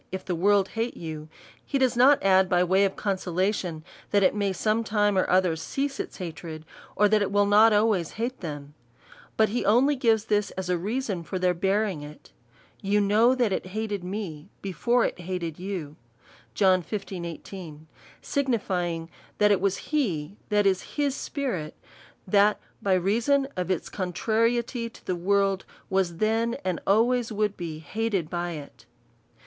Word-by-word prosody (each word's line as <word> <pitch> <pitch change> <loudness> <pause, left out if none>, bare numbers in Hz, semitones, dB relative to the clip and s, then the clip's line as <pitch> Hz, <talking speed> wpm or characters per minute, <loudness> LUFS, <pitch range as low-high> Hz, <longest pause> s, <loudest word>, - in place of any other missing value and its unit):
If 190 0 -5
the 180 - -2
world 195 +2 +3
hate 230 +3 -3
you, 155 -2 -7 0.3
(he 280 - -1
does 260 -2 +2
not 265 +4 +5
add 190 -1 +4
by 180 0 +3
way 190 +2 +3
of 195 - -2
consolation, 185 -3 -1 0.3
that 205 -1 +3
it 185 - +4
may 200 -1 0
some 215 +4 0
time 205 -2 +1
or 185 - +1
other 185 -2 +3
cease 275 - -3
its - - -5
hatred, 165 -3 -7 0.3
or 210 - +4
that 215 0 +3
it 195 - 0
will 205 0 +3
not 210 +2 +6
always 210 -5 +2
hate 240 +4 -3
them; 145 -4 -7 0.6
but 220 -1 +4
he 245 +4 -1
only 245 +9 +4
gives 225 -4 +2
this 210 -2 +1
as 185 -1 -2
a 180 - +2
reason 210 -1 -2
for 170 +3 -5
their 180 0 +2
bearing 195 -1 0
it). 150 +1 -12 0.5
You 200 +1 +2
know 215 +5 +4
that 240 -6 +1
it 185 - -3
hated 210 -4 -2
me 180 -4 -5
he 195 - -3
fore 240 +8 +2
it - - -3
hated 175 -3 -4
2/ou: 185 -4 -4 2.4
signifying, 180 -11 -1 0.3
that 210 0 +4
it 195 - +3
was 200 -1 +1
he, 195 - -2
that 210 -1 +2
is, 190 -1 +3
his 285 -2 +1
spirit, 220 - -4 0.5
that 205 +2 +3 0.2
by 195 -2 +2
reason 235 +10 +2
of 180 -1 -3
its 185 - -1
contrariety 230 +5 -1
to - - -18
the 185 - -1
world, 195 +2 +1 0.3
was 185 -3 +1
then, 225 +3 +1
and 185 -3 -1
always 235 +3 +3
would 210 -1 0
be 165 -3 -5
hated 195 +2 -2
by 175 -1 -2
it. 145 -3 -10
200 Hz, 165 wpm, -26 LUFS, 180-220 Hz, 2.4 s, not